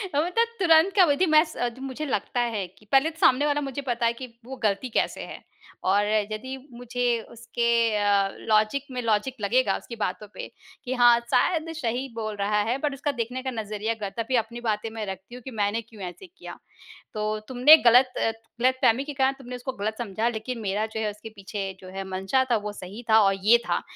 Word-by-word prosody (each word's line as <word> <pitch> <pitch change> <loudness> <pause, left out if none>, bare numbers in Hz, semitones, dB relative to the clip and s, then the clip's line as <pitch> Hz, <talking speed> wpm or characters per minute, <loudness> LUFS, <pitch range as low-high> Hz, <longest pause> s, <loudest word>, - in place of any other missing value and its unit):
अ, - - +2
मतलब 360 +9 +2
तुरंत 335 +1 +5
का 375 -3 +7
वही 285 -2 +2
थी 370 - +3
मैस 315 0 +4 0.3
मुझे 270 +3 -5
लगता 245 -1 -2 0.2
है 195 -3 -1
कि 200 +4 -23
पहले 275 +4 +5
तो 325 0 -15
सामने 265 +3 +4
वाला 295 0 +1
मुझे 275 0 -4
पता 240 -3 -1
है 230 - +3
कि, 255 +2 -8 0.2
वो 265 +1 -7
गलती 210 +4 0
कैसे - - -1
है? - - -9 0.4
और 200 +2 +3 0.3
यदि 260 +5 -5 0.2
मुझे 245 +1 -4 0.3
उसके 235 +1 -3 0.3
अ, 200 -1 +2 0.2
लॉजिक 215 +5 +3
में 250 -1 -3
लॉजिक 230 +3 0
लगेगा, 245 +6 +2
उसकी 235 - -9
बातों 210 -1 -3
पे - - -7 0.4
कि 255 - -2
हाँ, 240 -1 +6
शायद 295 +7 +1
सही 250 -1 -2
बोल 215 -2 -4
रहा 205 +1 +1
है 250 - +1
बट 290 - +1
उसका 285 +2 -2
देखने 250 0 -4
का 260 - -2
नज़रिया 215 -1 -3
गलत 205 -3 -6
है, - - +1
तभी 255 +3 -1
अपनी 235 +1 -1
बातें 220 -1 -1
मैं 220 -1 -5
रखती 190 +4 -8
हूँ 250 - -10
कि 265 - -7
मैंने 210 +1 0
क्यों 225 -2 -15
ऐसे 180 - -8
किया। 360 - -11 0.6
तो 215 0 -2
तुमने 260 +5 +8
गलत 250 +2 +6
अ, 225 - +1 0.3
गलतफ़हमी 255 0 +3
के 295 - -6
कारण 265 0 +2
तुमने 250 -1 -8
उसको 250 +2 -4
गलत 215 +1 -3
समझा 220 -1 -2
लेकिन 235 +2 -5
मेरा 205 +1 -1
जो 220 0 -6
है 215 -1 0
उसके 210 +2 -11
पीछे 200 -1 -6
जो 185 - -10
है 195 - -2
मंशा 195 +8 +1
था, 235 - +4
वो 210 0 -5
सही 205 +4 -9
था, 220 0 +7
और 195 -1 +3
ये 225 +4 +7
था - - +1
235 Hz, 220 wpm, -25 LUFS, 210-265 Hz, 0.6 s, तुमने